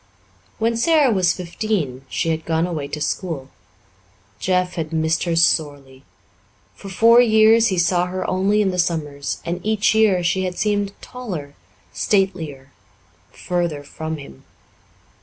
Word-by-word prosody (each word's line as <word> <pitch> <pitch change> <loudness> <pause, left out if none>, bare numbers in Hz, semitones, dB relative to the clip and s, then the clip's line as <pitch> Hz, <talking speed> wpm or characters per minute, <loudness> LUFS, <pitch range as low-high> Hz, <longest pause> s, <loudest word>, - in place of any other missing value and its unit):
When 230 +1 0
Sara 300 0 +3
was 185 -3 +3
fifteen 170 - -3
she 165 - -1
had 160 0 -1
gone 165 +1 0
away 160 -5 -4
to 150 +2 -6
school. 150 -3 -3 0.9
Jeff 180 -1 0
had 160 -2 -4
missed 160 +1 0
her 170 -1 0
sorely. 145 -5 0 0.7
For 195 - -11
four 230 +5 +6
years 220 0 +5
he 190 - -1
saw 175 +1 +2
her 185 +1 -4
only 200 +3 +2
in 190 - 0
the 180 - -3
summers, 150 -5 -2
and 175 +1 -4
each 215 0 +2
year 210 -5 +3
she 185 +2 0
had 180 -1 -4
seemed 205 -1 -1
taller, 180 - -7 0.4
statelier, 165 -9 -1 0.6
further 170 -5 -3
from 160 +2 -6
him. 140 - -13
180 Hz, 140 wpm, -21 LUFS, 160-205 Hz, 0.9 s, four